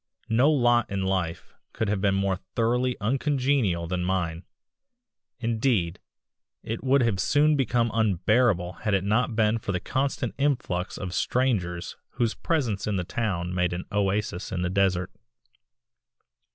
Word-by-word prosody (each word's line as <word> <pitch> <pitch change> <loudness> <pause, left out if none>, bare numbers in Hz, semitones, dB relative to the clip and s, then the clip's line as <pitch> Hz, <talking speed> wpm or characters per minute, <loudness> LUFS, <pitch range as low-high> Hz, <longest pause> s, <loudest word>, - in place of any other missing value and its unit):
No 120 +6 +4
lot 120 -5 +3
in 95 -1 -2
life 95 -3 -2 0.2
could 110 - -1
have 100 -1 0
been 100 -1 +2
more 95 -1 0 0.2
thoroughly 125 +2 +1
uncongenial 130 - +1
than 90 +1 -2
mine; 90 -2 -2 0.9
indeed, 115 -7 0 0.6
it 115 +1 -4
would 135 0 +3
have 110 -5 0
soon 150 +8 +3
become 120 -3 +1
unbearable 105 -2 +2
had 105 -2 +1
it 95 - 0
not 110 +4 +1
been 110 0 +2
for 100 - -4
the 90 - -1
constant 135 +8 -2
influx 120 -10 -1
of 90 -2 -5
strangers 95 -11 -1 0.2
whose 115 -2 0
presence 125 - -1
in 105 - 0
the 90 - -1
town 90 -4 -2
made 90 -1 0
an 90 +1 -4
oasis 100 -2 -1
in 90 -1 -2
the 90 - -1
desert. 95 -1 +1
105 Hz, 145 wpm, -26 LUFS, 90-120 Hz, 0.9 s, No